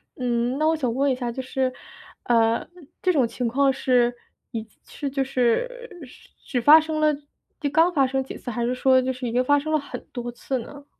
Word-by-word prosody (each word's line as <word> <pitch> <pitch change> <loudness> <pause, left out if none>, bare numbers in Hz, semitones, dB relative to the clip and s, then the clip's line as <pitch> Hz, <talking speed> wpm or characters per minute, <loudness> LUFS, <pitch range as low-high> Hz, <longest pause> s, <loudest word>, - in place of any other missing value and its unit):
嗯， 245 0 -1
那 310 +1 +2
我 - - +3
想 255 -7 -1
问 275 +1 +2
一 - - +1
下 245 -2 -3
就 260 - -4
是， 260 0 -1 0.5
呃， 230 -1 +2 0.4
这 370 - +3
种 265 -8 +2
情 245 - -4
况 270 +3 +2
是 245 -2 +2 0.4
一 225 -2 -4 0.2
是 285 -2 -5
就 270 0 -2
是 450 - 0 0.6
只 245 -3 -1
发 300 +5 +9
生 315 0 -3
了 305 - +4 0.7
刚 330 +3 +4
发 275 -3 +3
生 265 +1 -1
几 265 - -8
次？ 245 - -8
还 235 0 -2
是 245 - 0
说 260 0 +4
就 260 +1 -1
是 255 -1 -5
已 230 - -4
经 250 +1 +2
发 290 +2 +3
生 310 +2 -3
了 310 - +5
很 285 - -9
多 240 -1 -4
次 255 +2 -3
呢？ 285 +4 -10
260 Hz, 230 characters per minute, -24 LUFS, 245-285 Hz, 0.7 s, 发